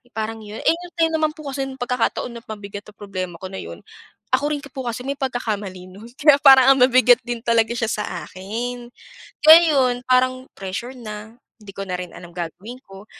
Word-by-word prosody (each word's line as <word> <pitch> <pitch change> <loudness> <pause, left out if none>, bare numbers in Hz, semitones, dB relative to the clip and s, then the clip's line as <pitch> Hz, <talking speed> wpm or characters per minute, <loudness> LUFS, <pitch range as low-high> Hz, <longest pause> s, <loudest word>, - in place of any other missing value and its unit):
Parang 220 0 -3
yun, 210 +1 -8
eh, - - +4
yung 350 +1 -9
time 325 0 +3
naman 310 -1 +1
po 310 -2 -12
kasi 270 0 -3
yung 265 0 -8
pagkakataon 245 -1 -2
na - - -20
mabigat 205 -1 -8
ang 210 - -19
problema 185 -4 -5
ko 190 - -9
na 190 - -6
yun, - - -9 0.5
ako 295 +1 +2
rin 290 - -3
po 265 -2 -8
kasi 235 +1 -3
may 280 +1 -4
pagkakamali 210 -8 -4
nun 200 +5 -13
kaya 290 -1 +6
parang 270 -1 +8
ang - - -1
bi 255 0 +4
bigat 245 0 +6
din 240 -1 -4
talaga 230 -1 +2
siya 230 -2 -2
sa 210 - -2 0.2
akin. 240 +6 -5 0.6
Kaya 320 +2 +10
yun, 255 -2 +3
parang 255 +1 +2
pressure 195 +7 -5
na, 220 0 -9 0.2
'di 205 -2 -12
ko 195 - -6
na 180 -1 -3
rin 180 -2 -7
alam 175 -1 -11
gagawin 180 +7 -7
ko, 195 +1 -13
235 Hz, 210 wpm, -21 LUFS, 205-265 Hz, 0.6 s, Kaya